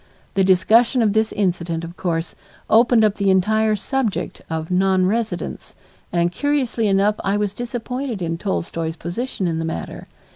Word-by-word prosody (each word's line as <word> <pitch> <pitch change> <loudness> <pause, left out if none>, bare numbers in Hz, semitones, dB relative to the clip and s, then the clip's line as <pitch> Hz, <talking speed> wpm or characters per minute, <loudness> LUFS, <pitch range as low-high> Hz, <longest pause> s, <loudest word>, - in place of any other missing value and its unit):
The 195 - +2
discussion 225 +6 +4
of 210 -2 +2
this 220 0 +2
incident, 170 -4 -1
of 170 +1 -8
course, 165 -2 -2 0.4
opened 230 0 +5
up 210 -1 +2
the 200 -1 +1
entire 215 +3 +3
subject 235 +1 -2
of 160 +1 -4
nonresidence, 190 +4 0 0.4
and 170 0 +1
curiously 255 -1 0
enough 200 +2 +2
I 195 +1 +1
was 205 -1 -1
disappointed 245 +1 -4
in 165 -2 -3
Tolstoy's 165 -4 -3
position 190 +5 -4
in 165 -2 -1
the - - -2
matter. 165 - -5
200 Hz, 150 wpm, -21 LUFS, 175-225 Hz, 0.4 s, opened